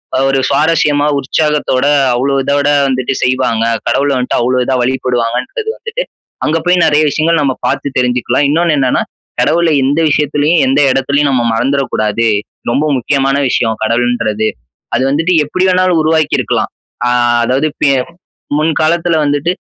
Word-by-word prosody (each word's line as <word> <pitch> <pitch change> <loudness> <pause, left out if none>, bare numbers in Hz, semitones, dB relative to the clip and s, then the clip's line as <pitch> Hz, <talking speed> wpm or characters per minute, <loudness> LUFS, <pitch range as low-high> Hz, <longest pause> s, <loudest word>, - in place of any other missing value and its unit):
அ - - +1
ஒரு 135 0 +1
சுவாரசியமா, 145 0 +1
உற்சாகத்தோட 145 -1 0 0.3
அவ்ளோ 135 +3 0
இதோட 145 +2 0 0.2
வந்துட்டு 130 0 -1
செய்வாங்க. 125 -3 0 0.2
கடவுள 140 +1 +1
வந்துட்டு 125 0 -1
அவ்ளோ 125 +1 0
இதா 130 +1 -1
வழிபடுவாங்கன்றது 130 - -2
வந்துட்டு, 480 +2 -4 0.4
அங்க 155 +2 +1
போய் 180 0 +3
நெறைய 150 -1 +3
விஷயங்கள் 160 +2 +1
நம்ம 135 -2 0
பாத்து - - -1
தெரிஞ்சுக்கலாம். 125 +2 +1
இன்னொன்னு 165 0 +1
என்னன்னா, 130 -2 +1 0.4
கடவுள 170 +1 +2
எந்த 145 +4 +1
விஷயத்துலயும், 150 +3 +1
எந்த 135 +2 +2
இடத்துலயும் 140 +2 +1
நாம 120 -2 0
மறந்துறக் 135 +3 -1
கூடாது. 110 +2 0 0.4
ரொம்ப 150 +5 0
முக்கியமான 135 +2 0
விஷயம், 115 -2 0
கடவுள்ன்றது. 115 -2 0 0.5
அது - - 0
வந்துட்டு 165 +5 +1
எப்படி 185 +6 -2
வேணாலும் 185 -2 +2
உருவாக்கிருக்கலாம். 155 -1 0 0.4
ஆ, - - +1 0.4
அதாவது 135 +5 0
பே 140 - +4 0.7
முன் 155 +1 +1
காலத்துல 170 +1 +1
வந்துட்டு 145 +4 0
140 Hz, 140 wpm, -13 LUFS, 130-155 Hz, 0.7 s, பே